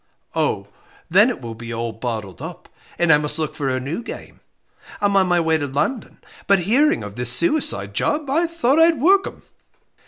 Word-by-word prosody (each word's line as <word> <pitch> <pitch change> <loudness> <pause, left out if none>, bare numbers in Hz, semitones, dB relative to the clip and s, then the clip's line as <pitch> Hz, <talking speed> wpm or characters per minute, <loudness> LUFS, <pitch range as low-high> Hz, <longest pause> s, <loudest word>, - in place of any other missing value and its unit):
"Oh, - - -1 0.4
then 205 +7 +6
it 245 - -5
will 115 -2 -6
be 115 +1 -9
all 115 0 -3
bottled 110 -3 -6
up - - -8 0.3
and 175 -2 +4
I 150 - +5
must 150 0 -4
look 155 -1 -2
for 140 -2 -2
a 130 0 -1
new 145 - -4
game. 240 - -9 0.6
I'm 205 -1 +1
on 190 -1 +4
my 175 -1 +2
way 160 -1 +1
to 145 - -2
London, 145 - -2 0.3
but 200 - +5
hearing 235 - +2
of 105 -1 -8
this 125 0 +1
suicide 275 - 0
job, 295 - -1
I 325 +6 +1
thought 320 -4 +1
I'd 325 -1 +5
work 385 +8 +4
'em." - - -10
165 Hz, 195 wpm, -21 LUFS, -, 0.6 s, then